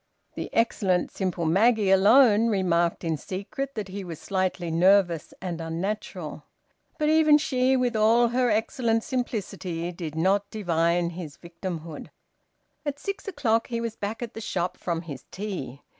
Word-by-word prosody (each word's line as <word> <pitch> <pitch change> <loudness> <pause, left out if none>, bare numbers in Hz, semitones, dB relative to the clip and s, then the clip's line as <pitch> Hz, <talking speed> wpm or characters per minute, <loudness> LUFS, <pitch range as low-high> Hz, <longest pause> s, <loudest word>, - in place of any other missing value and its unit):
The - - -5
excellent, 195 -5 +1
simple 185 -3 -2
Maggie 205 +4 +3
alone 220 +3 +6
remarked 175 -5 +1
in 165 -2 -1
secret 200 - -5
that 210 -3 -4
he 195 +1 -5
was 170 -4 -7
slightly 185 -3 -2
nervous 175 -1 +3
and 175 -3 -4
unnatural. 180 +6 -4 0.5
But 300 0 +1
even 310 -1 +6
she, 260 -3 +2
with 245 -2 0
all 230 +2 +4
her 250 +1 +2
excellent 225 +1 +1
simplicity, 190 - -3
did 165 -3 -6
not 195 +5 +1
divine 170 -4 +1
his 165 -4 -8
victimhood. 170 -2 -7 0.7
At 290 -2 -3
six 395 +7 -5
o'clock 235 - +1
he 235 -1 -2
was 230 -1 -3
back 215 +4 -4
at 235 - -7
the 225 - -7
shop 180 -4 -2
from 170 -1 -3
his 145 -6 -8
tea. 185 -9 -6
195 Hz, 150 wpm, -26 LUFS, 170-230 Hz, 0.7 s, alone